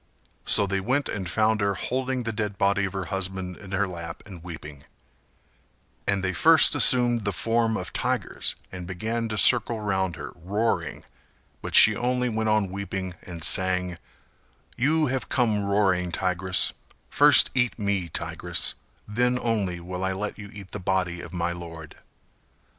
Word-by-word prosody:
So 100 - +3
they 100 0 -1
went 130 +8 -1
and 95 -4 -4
found 110 +2 +1
her 100 -1 0
holding 130 +3 -2
the 115 - -3
dead 105 -2 -4
body 100 0 +1
of 95 - -5
her 95 -2 -4
husband 95 -1 -3
In 95 - -12
her 100 +1 0
lap 85 -2 -8
and 90 -4 -11
weeping; 75 -5 -10 1.2
and 100 -1 +1
they 95 0 -1
first 160 - +6
assumed 120 -2 +4
the 100 - -1
form 115 +4 0
of - - -6
tigers - - -2 0.2
and 90 -1 -8
began 110 +5 -3
to 105 - -4
circle 120 0 +4
round 95 -4 -1
her - - -8
roaring, 105 +7 -2 0.6
but - - -4
she 110 - +9
only 125 +2 0
went 110 -1 -1
on 105 -3 +1
weeping 95 -1 -5
and 85 -3 -9
sang 90 -1 +1 0.8
"You 155 +6 +2
have 130 -2 -3
come 110 -5 +1
roaring, 95 -3 +1
tigress: 95 +1 +1 0.4
First - - +7
eat 125 -2 0
me, 100 -5 -2
tigress: - - -1 0.3
Then 125 +4 +1
only 105 -8 -1
will 90 +2 -6
I 95 0 0
let 105 +2 -4
you 105 -1 -10
eat 100 -2 -11
the 105 - -5
body 90 -2 -1
of - - -10
my 85 -1 -2
lord." 85 -3 -9
100 Hz, 165 wpm, -25 LUFS, 90-110 Hz, 1.2 s, she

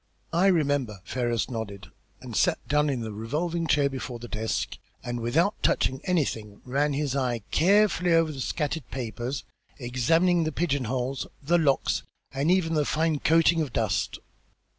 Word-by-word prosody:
"I 175 +4 +4
remember," 145 - +1
Ferrars 120 -1 -1
nodded, 105 -5 -6 0.3
and - - -8
sat - - +3
down 150 0 +2
in 130 -4 -1
the 110 -1 -4
revolving 160 +10 -2
chair 145 -2 +3
before 130 -2 -5
the 120 +1 -9
desk, 110 0 -3 0.2
and, 120 -1 -3
without 165 - +1
touching 130 - +1
anything, 115 - -1
ran 140 +3 +1
his 140 -1 -1
eye 125 -5 -1
carefully 195 0 +3
over 165 -1 +4
the 135 -3 -6
scattered 150 -1 -2
papers, 125 +1 -4 0.3
examined 160 +7 +2
the - - -1
pigeon 140 -5 0
holes, 130 +3 -2 0.2
the 170 +5 +3
locks, 140 -4 +2 0.3
and 140 +4 0
even 180 -3 +2
the 150 -2 +2
fine 155 +1 0
coating 165 +2 +4
of 140 -7 -3
dust. - - 0
140 Hz, 160 wpm, -27 LUFS, 120-165 Hz, 0.3 s, I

